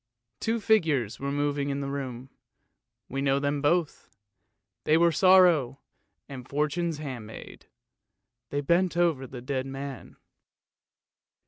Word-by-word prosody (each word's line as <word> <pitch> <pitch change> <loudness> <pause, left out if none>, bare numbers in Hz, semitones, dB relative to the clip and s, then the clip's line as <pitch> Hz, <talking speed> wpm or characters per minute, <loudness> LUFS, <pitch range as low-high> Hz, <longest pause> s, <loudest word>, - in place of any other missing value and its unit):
Two 230 +1 -1
figures 155 - +1
were 140 +1 -3
moving 145 0 -1
about - - -1
in 140 - -3
the 140 - -3
room; 130 -2 -6 0.8
we 135 +1 -4
know 135 0 +2
them 145 0 -1
both. 155 +2 0 0.7
They 155 - +3
were 170 0 +4
Sorrow 170 -7 +4 0.5
and 130 -2 -9
Fortune's 150 +3 -1
handmaid; 125 -7 -9 0.8
they 145 - -2
bent 170 +4 +1
over 160 -7 +1
the 125 -1 -9
dead 130 0 -3
man. 135 -1 -7
140 Hz, 125 wpm, -27 LUFS, 135-165 Hz, 0.8 s, were